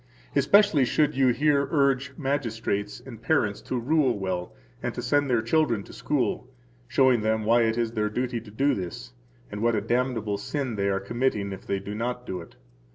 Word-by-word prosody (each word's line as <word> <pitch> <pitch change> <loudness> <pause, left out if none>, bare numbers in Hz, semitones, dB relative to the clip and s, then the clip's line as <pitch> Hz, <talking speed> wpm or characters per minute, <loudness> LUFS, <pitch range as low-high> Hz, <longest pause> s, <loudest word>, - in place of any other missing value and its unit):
Especially 200 -9 +5
should 150 +4 +2
you 135 -1 +3
here 140 +2 +2
urge 140 -2 +1
magistrates 115 -7 -2
and 115 -4 -11
parents 115 -6 +1
to 130 - -3
rule 130 -2 +2
well 95 -2 -3 0.3
and - - -3
to - - -3
send 145 -1 +2
their 120 -3 +2
children 115 -4 +1
to - - -13
school, 130 -3 -1 0.4
showing 130 -2 +3
them 110 0 0
why 115 +2 +4
it 110 +1 0
is 115 -1 0
their 105 -2 -1
duty 120 +1 -2
to - - -13
do 135 +7 +1
this, 85 -10 -6 0.4
and 105 - -5
what 115 0 +2
a 105 - 0
damnable 115 -3 -1
sin 130 +1 -3
they 100 -1 0
are 95 0 +1
committing 105 -1 -1
if 95 - -11
they 100 - 0
do 100 +1 -6
not 125 +3 -3
do 90 -5 -4
it. 85 - -14
120 Hz, 195 wpm, -26 LUFS, 105-135 Hz, 0.4 s, Especially